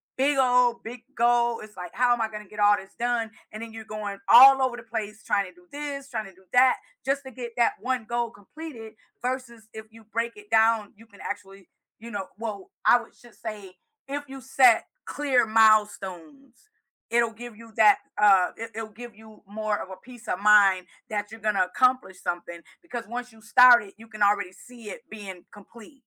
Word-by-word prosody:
big 275 +1 +1
old 250 -2 +3
big 235 +1 -8
goal, 235 0 +2
it's, 215 -2 -13
like, 180 -1 -8
"How 250 0 +3
am 240 - -2
I 220 - +1
gonna 210 -1 -8
get 210 +2 -12
all 205 0 +5
this 195 - -12
done?" 235 -2 -1 0.2
And 215 +1 -8
then 225 - -9
you're 220 -1 -8
going 210 -2 -6
all 265 +4 +9
over 255 -2 0
the 245 - -10
place 220 -1 -6
trying 200 -1 0
to 180 - -13
do 180 0 -23
this, 285 -1 -6
trying 220 -3 -4
to 190 -2 -14
do 190 0 -24
that, 255 +1 +5 0.3
just 275 +1 0
to 265 - -10
get 240 -1 -8
that 235 - +2
one 255 -3 -2
goal 235 0 -2
completed 225 0 -11 0.3
versus 245 -3 -5
if 220 0 -9
you 225 0 -16
break 230 +2 -3
it 415 0 -15
down, 220 -1 +3
you 225 +2 -18
can 200 -2 -17
actually, 195 -2 -8 0.3
you 230 0 -10
know, 195 -2 -5
well, 215 -4 -6 0.2
I 245 - +7
would 235 - -13
just 240 -2 -20
say, 205 -4 -8 0.3
if 285 +1 -5
you 270 0 -10
set 255 -3 +4 0.2
clear 270 -5 +1
milestones, 215 - +1 0.4
it'll 235 -1 +2
give 235 0 -10
you 230 -1 -14
that 210 -2 +6 0.2
uh, 195 -3 +5
it 225 0 -7
it'll 225 -1 -5
give 230 +1 -11
you 220 -1 -17
more 210 0 -2
of - - -7
a 190 - -8
peace 240 -2 -15
of 180 - -2
mind 200 -3 +5 0.2
that 205 0 -3
you're 225 - -10
gonna 210 -3 +1
accomplish 245 -2 0
something 170 -1 -5 0.2
because 240 -10 -7
once 245 +1 -6
you 220 0 -19
start 245 +1 +7
it, 195 - -14
you 225 0 -15
can 215 -1 -12
already 200 -2 +2
see 235 0 -13
it - - -12
being 195 -4 -9
complete. 230 +6 -15
225 Hz, 205 wpm, -25 LUFS, 205-245 Hz, 0.4 s, all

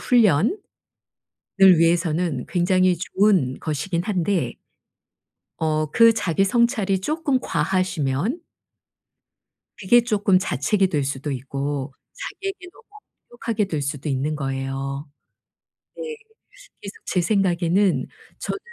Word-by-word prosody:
훈련을 230 - +3 1.2
위해서는 165 -4 +1
굉장히 185 0 +2
좋은 185 -7 +1
것이긴 165 +3 -2
한데 190 -3 -1 1.0
어 155 -1 0
그 230 -1 +6
자기 195 -3 +1
성찰이 210 -3 +1
쪼끔 295 - 0
과하시면 185 - -1 1.4
그게 235 +5 +4
쪼끔 205 -5 +2
자책이 190 +4 +1
될 150 -6 -1
수도 140 +1 -4
있고 140 +1 -4 0.2
자기에게 390 -2 -6
너무 465 - -20 0.5
엄격하게 230 -3 -2
될 155 -6 -3
수도 145 +1 -4
있는 145 +3 -1
거예요. 135 +1 -4 0.9
네. 470 -1 -6 0.6
그래서 200 - -8
제 180 - 0
생각에는 180 -5 +1 0.3
저는 410 - -4
180 Hz, 230 characters per minute, -22 LUFS, 145-210 Hz, 1.4 s, 그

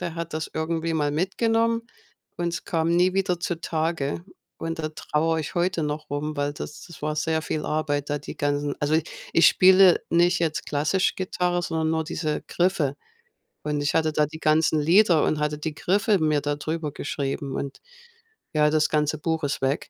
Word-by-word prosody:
Der 170 -2 -4
hat 165 -1 -5
das 155 0 -3
irgendwie 165 +1 -2
mal 150 -2 +1
mitgenommen 225 +7 +1 0.5
und 175 0 -1
es 170 - -4
kam 165 -1 0
nie 180 +2 +3
wieder 190 -3 +1
zutage. 165 -2 -2 0.3
Und 165 0 -4
da 155 -1 -2
trauere 160 +1 -1
ich 150 - -6
heute 175 -1 0
noch 150 0 -4
rum, 150 +2 -3
weil 145 0 -1
das 150 - -8
das 170 - -13
war 150 0 -1
sehr 160 +1 0
viel 155 -1 -3
Arbeit, 145 -2 -1
da 145 - 0
die 140 - -9
ganzen 145 0 -1
also, 150 +2 +2 0.3
ich 165 - +6
spiele 185 -1 +6
nicht 175 +2 +3
jetzt 160 -2 -1
klassisch 155 +6 +1
Gitarre, 180 -2 -1
sondern 160 -2 -1
nur 160 0 0
diese 155 -1 -3
Griffe. 175 -6 +1 0.7
Und 150 -1 -1
ich 145 - 0
hatte 160 -1 +2
da 150 -1 +3
die 160 +1 -10
ganzen 155 0 +3
Lieder 170 +1 +5
und 155 - 0
hatte 150 0 -1
die 155 +1 -4
Griffe 200 +3 +2
mir 155 -2 +2
da 145 0 -1
drüber 155 0 -3
geschrieben 140 -1 -4
und, 140 - -5 0.7
ja, 150 -1 +4
das 155 0 +2
ganze 150 0 +1
Buch 160 0 -1
ist 140 -1 -2
weg. 135 +3 -1
160 Hz, 185 wpm, -25 LUFS, 150-175 Hz, 0.7 s, ich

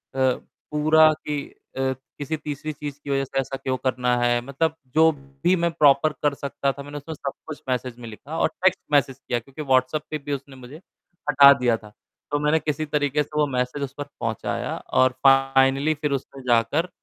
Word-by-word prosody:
पूरा 150 +4 +2
कि 150 -2 -4 0.3
अ, 135 0 +1 0.3
किसी 145 +2 -3
तीसरी 150 0 -5
चीज़ 145 -1 -7
की 140 - -8
वज़ह 135 0 +1
से 135 - -2
ऐसा 135 0 -3
क्यों 130 -1 -2
करना 125 -1 0
है? 120 0 +2
मतलब 140 +5 -1 0.2
जो 160 +1 +6 0.3
भी 180 +2 +4
मैं 170 -1 0
प्रॉपर 150 -1 +4
कर 145 -1 +3
सकता 140 0 -2
था 140 +1 -9
मैंने 145 +1 -8
उसमें 145 +3 -7
सब 140 -1 -4 0.2
कुछ 155 -2 -7
मैसेज 125 -1 -2
में 120 - -8
लिखा 140 +9 -8
और - - +4 0.2
टेक्स्ट 185 - +4
मैसेज 140 -2 +2
किया 120 - -2
क्योंकि 135 +6 -10
व्हाट्सप्प 135 +2 +1
पे 155 - -1
भी 145 0 -5
उसने 135 0 -6
मुझे 130 +3 -11 0.5
हटा 140 -1 +9
दिया 120 -2 +3
था, 105 -1 -14 0.4
तो 145 - +1
मैंने 150 +2 +2
किसी 150 0 -2
तरीके 150 -1 0
से - - -18
वो 150 - +3
मैसेज 125 +3 -1
उस 135 -1 -5
पर 145 - -3 0.2
पहुँचाया - - -3 0.3
और 130 - +5 0.2
फ़ाइनली 135 +2 +4
फिर 150 - 0
उसने 135 +1 -14
जाकर 125 +9 +2
140 Hz, 195 wpm, -24 LUFS, 130-150 Hz, 0.5 s, हटा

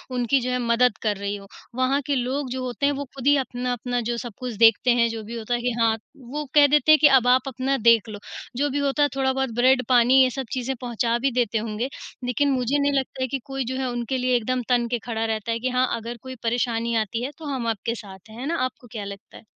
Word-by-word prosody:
उनकी 250 +2 +2
जो 250 - -2
है 250 - +1
मदद 235 -2 +2
कर 210 -2 0
रही 200 +1 -3
हो। 200 -1 -10 0.3
वहाँ 260 +2 +1
के 285 - +1
लोग 260 +2 -2
जो 260 0 -3
होते 250 +2 -2
हैं 285 - +3
वो 285 0 -4
ख़ुद 265 0 -7
ही 290 - +6
अपना-अपना 245 -1 -2
जो 240 - -1
सब 235 -1 -6
कुछ 250 -2 -4
देखते 230 +2 +5
हैं, 235 -1 +3
जो 225 -1 -5
भी 230 +2 -7
होता 225 +2 -3
है 240 - 0
कि 245 +1 0
हाँ, 225 -1 +3 0.2
वो 280 +4 -6
कह 290 -1 +8
देते 295 +2 +4
हैं 310 - +7
कि 300 - +9
अब 265 -3 +4
आप 255 +1 +5
अपना 265 +1 -1
देख 230 -1 +5
लो। 205 -1 -7 0.4
जो 290 +2 +1
भी 285 +1 -1
होता 285 +1 +1
है, 290 - +3
थोड़ा 265 -1 +1
बहुत 265 -2 -1
ब्रेड 255 +1 +4
पानी 250 +1 +6
ये 260 - +3
सब 265 +1 -5
चीज़ें 260 +1 -2
पहुँचा 235 -1 0
भी 270 +2 +1
देते 230 -2 +1
होंगे, 220 +3 -3 0.4
लेकिन 275 +4 +1
मुझे 260 +2 +1
नहीं 285 0 +1
लगता 265 0 -6
है 260 - +1
कि 270 +2 -3
कोई 270 -2 -3
जो - - -3
है 260 -1 -1
उनके 240 +2 -2
लिए 250 0 +1
एकदम 250 +2 0
तन 240 -1 +2
के 240 - 0
खड़ा 225 -1 -2
रहता 220 0 -2
है 230 - -1
कि 255 +2 -1
हाँ, 255 0 +2
अगर 230 +1 -6
कोई 260 0 -8
परेशानी 235 0 0
आती 230 +3 -4
है 265 - -3
तो 320 - -10
हम 240 -3 -3
आपके 225 +1 -2
साथ 195 -2 -12
हैं, 220 +2 -11
है 260 - -5
ना। 335 +2 -1
आपको 255 -1 -8
क्या 215 -3 -5
लगता 200 0 -10
है? - - -15
250 Hz, 270 wpm, -24 LUFS, 230-265 Hz, 0.4 s, कि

